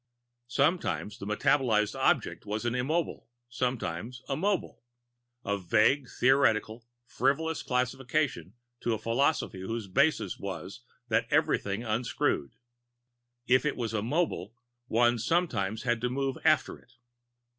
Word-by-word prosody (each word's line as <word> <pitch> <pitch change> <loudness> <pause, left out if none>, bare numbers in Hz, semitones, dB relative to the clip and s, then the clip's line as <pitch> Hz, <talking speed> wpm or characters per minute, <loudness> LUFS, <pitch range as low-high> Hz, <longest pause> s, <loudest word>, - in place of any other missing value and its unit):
Sometimes 140 - 0
the 100 - -6
metabolizable 105 0 +2
object - - +1
was 110 +3 -3
an 120 - 0
Immobile 150 +7 -1
and 120 0 -28
sometimes 120 -1 -3
a 135 - -1
Mobile 195 +4 -1 0.6
a 100 0 -1
vague, 115 +8 +2
theoretical, 120 -3 +2 0.2
frivolous 145 +7 0
classification 125 - -1 0.2
to 115 - 0
a - - -4
philosophy 115 -2 0
whose 115 +3 -4
basis 140 +11 +1
was 100 +2 -6 0.3
that 110 - +2
everything 100 +3 +1
unscrewed. 110 - -1 0.9
If 130 +1 +4
it 150 - 0
was 115 -3 -3
a 110 - 0
Mobile, 120 - -1 0.3
one 120 +1 +3
sometimes 110 - 0
had 120 -2 0
to 125 - 0
move 135 +1 -2
after 155 -4 +2
it. 125 - -25
120 Hz, 125 wpm, -29 LUFS, 110-135 Hz, 0.9 s, If